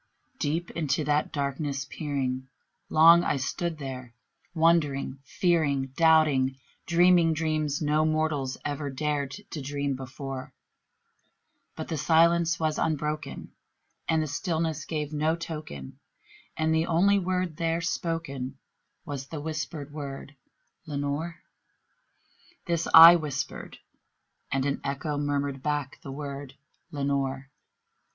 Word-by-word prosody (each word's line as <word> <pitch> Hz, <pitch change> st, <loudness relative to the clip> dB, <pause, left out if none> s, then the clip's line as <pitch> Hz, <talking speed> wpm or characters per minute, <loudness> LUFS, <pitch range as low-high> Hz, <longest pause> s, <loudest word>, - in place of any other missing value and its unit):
Deep 165 Hz, +4 st, -1 dB
into 155 Hz, -1 st, -1 dB
that 150 Hz, +1 st, +1 dB
darkness 140 Hz, -1 st, -2 dB
peering, 130 Hz, -3 st, -3 dB, 0.4 s
long 165 Hz, +2 st, +7 dB
I 145 Hz, -, +1 dB
stood 165 Hz, +5 st, -2 dB
there 130 Hz, -4 st, -7 dB, 0.4 s
wondering, 150 Hz, -5 st, +2 dB
fearing, 140 Hz, -5 st, +1 dB
Doubting, 155 Hz, -5 st, +4 dB, 0.3 s
dreaming 175 Hz, -1 st, +5 dB
dreams 155 Hz, -2 st, -1 dB
no 150 Hz, +1 st, +2 dB
mortal 155 Hz, -3 st, 0 dB, 0.2 s
ever 145 Hz, 0 st, -2 dB
dared 145 Hz, 0 st, -1 dB, 0.2 s
to 155 Hz, -, -4 dB
dream 140 Hz, 0 st, -2 dB
before; 135 Hz, +1 st, -7 dB, 1.2 s
But -, -, -6 dB
the 160 Hz, -, -2 dB
silence 165 Hz, +1 st, +3 dB
was 155 Hz, -1 st, 0 dB
unbroken, 150 Hz, -2 st, -2 dB, 0.6 s
and 160 Hz, -1 st, +3 dB
the 145 Hz, -2 st, -3 dB
darkness 160 Hz, -3 st, -1 dB
gave 150 Hz, -2 st, -3 dB
no 155 Hz, +2 st, +1 dB
token, 155 Hz, -, -7 dB, 0.6 s
And 160 Hz, 0 st, +1 dB
the 160 Hz, +1 st, +1 dB
only 195 Hz, +5 st, +4 dB
word 180 Hz, -3 st, -2 dB
there 165 Hz, 0 st, 0 dB
spoken 160 Hz, -6 st, -3 dB, 0.5 s
was 140 Hz, -3 st, -5 dB
the 155 Hz, -, -6 dB
whispered 150 Hz, -1 st, -5 dB
word, 145 Hz, -1 st, -7 dB, 0.5 s
"Lenore!" 145 Hz, +3 st, -3 dB, 1.2 s
This 170 Hz, -2 st, -1 dB
I 165 Hz, +2 st, +11 dB
whispered, 150 Hz, -5 st, -5 dB, 0.7 s
and 135 Hz, 0 st, 0 dB
an 140 Hz, -1 st, -1 dB
echo 140 Hz, +2 st, -2 dB
murmured 140 Hz, -2 st, -1 dB
back 145 Hz, -2 st, -2 dB
the 135 Hz, -, -8 dB
word, 140 Hz, -1 st, -7 dB, 0.3 s
"Lenore!" 140 Hz, -2 st, -2 dB
150 Hz, 115 wpm, -27 LUFS, 140-160 Hz, 1.2 s, I